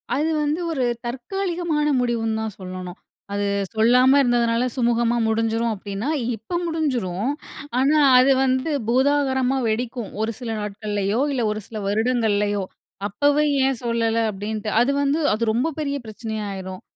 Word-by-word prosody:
அது 305 +3 +1
வந்து 295 +3 0
ஒரு 260 -5 0 0.2
தற்காலிகமான 335 +4 -2
முடிவுன்னு 225 -2 0
தான் 220 -3 -4
சொல்லணும். 185 -1 -7 0.4
அது 205 0 -1 0.3
சொல்லாம 250 +5 +5
இருந்ததுனால 240 -1 +2
சுமூகமாமுடிஞ்சிரும் 230 -2 +1
அப்பிடின்னா, 205 +6 -4 0.3
இப்ப 225 - -4
முடிஞ்சிரும். 255 - -1 0.5
ஆனா, 280 +4 +3 0.2
அது 265 +2 +5
வந்து 260 +4 +1 0.2
பூதாகரமா 265 0 +2
வெடிக்கும். 235 0 -2
ஒரு 220 +1 0
சில 240 -3 -5
நாட்கள்லயோ! 205 +1 -2
இல்ல 255 -3 0
ஒரு 215 - -3
சில 220 - -7
வருடங்கள்லயோ! 210 -2 +1 0.4
"அப்பவே 290 +8 +2 0.2
ஏன் 265 -3 0
சொல்லல?" 230 -1 0
அப்பிடின்ட்டு, 210 +2 -4
அது 255 - +3
வந்து 285 +3 +1
அது 220 +2 -1
ரொம்ப 245 +8 +1
பெரிய 285 -2 -1
பிரச்சனையா 220 0 -5
ஆயிரும். 190 -1 -7
235 Hz, 130 wpm, -22 LUFS, 215-270 Hz, 0.5 s, சொல்லாம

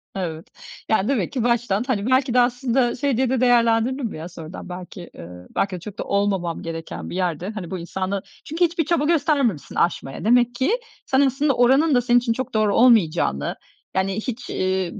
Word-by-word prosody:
Evet. 165 -4 -4 0.4
Yani, 220 -2 +2
demek 245 -9 0
ki 255 -5 -2
baştan, 235 -3 +1
hani, 210 -5 -1
belki 260 -1 +2
de 250 - +4
aslında 245 0 +1
şey 265 -2 0
diye 260 -1 +1
de 260 -1 0
değerlendirdin 240 +1 +3
mi 210 - -5
ya 165 +3 -7
sonradan 165 +1 -9
belki, 180 0 -8
ııı, 90 +1 -11
belki 195 -1 0
de 180 - -6
çok 205 +3 -9
da - - -1
olmamam 195 -4 -1
gereken 165 -1 -6
bir - - -6
yerde, 180 0 -2
hani, 200 -6 -7
bu 185 - -3
insanla 190 +3 -3 0.2
Çünkü 330 +4 +1
hiçbir 335 -2 -1
çaba 330 -4 +1
göstermemişsin 290 - +1
aşmaya. 170 -2 -1
Demek 240 +1 +3
ki 265 +10 +1 0.3
sen 265 +1 +2
aslında 275 +1 +2
oranın 265 +5 +4
da 245 - +4
senin 245 0 +4
için 240 -1 0
çok 260 +1 -5
doğru 215 -2 +2
olmayacağını, 175 - +3 0.4
yani, 190 0 0
hiç, 245 +2 -5
iii, 185 -1 -1
225 Hz, 190 wpm, -22 LUFS, 185-255 Hz, 0.4 s, de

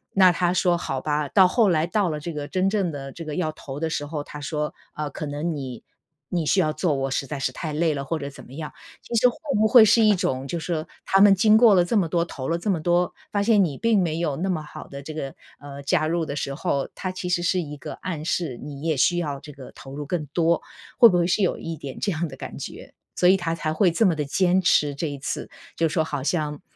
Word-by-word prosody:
那 185 -2 +7
他 175 0 +1
说： 180 -1 +2
“好 135 -6 -3
吧。” 150 +1 -1
到 190 -3 +6
后 210 +1 +3
来 160 -1 +2
到 200 -1 0
了 150 -1 -3
这 165 +2 -6
个 145 -1 -5
真 185 0 0
正 195 -5 0
的 135 -2 -7
这 165 - -8
个 150 -1 -5
要 160 -4 -1
投 140 -2 -8
的 160 - -1
时 145 -2 -2
候， 150 -2 -4
他 150 - -9
说： 150 +1 -3 0.2
“啊， 150 -1 -3
可 150 - -5
能 150 +3 -3
你 130 -4 -6 0.5
你 170 -3 -1
需 190 +5 +2
要 155 -4 +2
做， 155 -1 0
我 135 0 -2
实 135 - -1
在 150 - -4
是 130 - -1
太 155 +4 -5
累 155 +1 +1
了。” 140 - -3
或 165 +4 -2
者 140 -2 -5
怎 140 - -10
么 125 - -14
样。 155 +1 -6 0.3
其 - - -9
实 235 +2 +5
会 245 - -8 0.2
不 220 - +4
会 225 -1 +8
是 225 +2 +5
一 210 -1 +5
种 135 -7 -2
就 170 +4 -3
是 160 - -7
说 160 -3 -2 0.2
他 195 0 +3
们 200 -1 +8
经 215 +3 +5
过 220 -3 +7
了 175 -1 +4
这 225 - -1
么 180 -4 +2
多、 170 -1 +1
投 135 -5 -6
了 170 - +1
这 200 +3 -1
么 165 -4 -1
多， 175 +1 +1 0.2
发 205 -1 +1
现 210 -2 +4
你 150 -7 -2
并 225 -4 +2
没 165 -3 -1
有 160 -5 -1
那 190 +3 -2
么 160 -4 -1
好 150 - -10
地 140 0 -9
这 155 - -7
个 140 -3 -5 0.2
呃， 140 0 -9
加 155 +1 +1
入 165 0 0
的 140 -2 -5
时 140 -1 -3
候， 140 -1 -1
他 185 - -4
其 185 -1 -5
实 175 -1 +1
是 180 +1 +1
一 150 -2 -7
个 - - -7
暗 160 -4 -5
示， 165 -7 -1
你 145 -1 -8
也 160 -3 0
需 175 +7 +3
要 145 -4 -3
这 150 +1 -11
个 135 -2 -11
投 135 +1 -11
入 150 - -4
更 165 -3 -2
多。 170 -1 +2 0.3
会 235 -3 +9
不 180 - +1
会 170 - +2
是 195 +3 +1
有 180 - 0
一 165 -1 -5
点 135 -3 -8
这 200 - 0
样 165 +1 -2
的 135 - -9
感 - - -8
觉。 - - -9 0.2
所 180 - +5
以 190 - +7
他 165 -3 -2
才 155 -1 -2
会 185 +3 +3
这 190 +7 +2
么 175 - +3
地 150 - -1
坚 185 +5 +2
持 150 -4 +3
这 155 +3 -3
一 145 - -6
次， 135 - -4 0.3
就 165 -1 +1
是 - - -6
说 160 - +3
好 145 -3 -4
像 150 -1 -1
160 Hz, 300 characters per minute, -24 LUFS, 145-180 Hz, 0.5 s, 会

